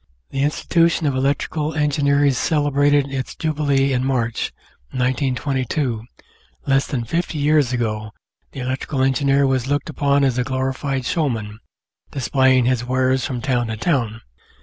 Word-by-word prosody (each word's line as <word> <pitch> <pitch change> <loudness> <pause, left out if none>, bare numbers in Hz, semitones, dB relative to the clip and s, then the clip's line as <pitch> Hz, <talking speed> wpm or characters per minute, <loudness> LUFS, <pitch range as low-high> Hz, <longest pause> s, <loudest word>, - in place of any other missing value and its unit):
The 135 - -2
Institution 165 +3 +1
of 140 -2 +1
Electrical 145 +3 -1
Engineers 145 -2 +2
celebrated 145 0 +2
its 130 -1 -4
Jubilee 140 -3 +1
in 125 0 0
March, 125 -4 -1 0.4
1922; 130 -1 -1 0.6
less 135 0 +2
than 125 -5 -2
fifty 165 +5 -2
years 145 -3 +3
ago 110 -3 -2 0.4
the 135 - -7
electrical 130 +2 -2
engineer 135 +1 +2
was 130 -2 0
looked 145 0 -1
upon 140 0 +2
as 130 -2 +1
a - - +2
glorified 130 0 -2
showman, 115 -10 -2 0.5
displaying 130 -1 +2
his 125 -1 +1
wares 130 +1 +1
from 125 -3 -4
town 120 -3 0
to 110 0 -4
town. 115 -6 -1
135 Hz, 135 wpm, -21 LUFS, 125-145 Hz, 0.6 s, years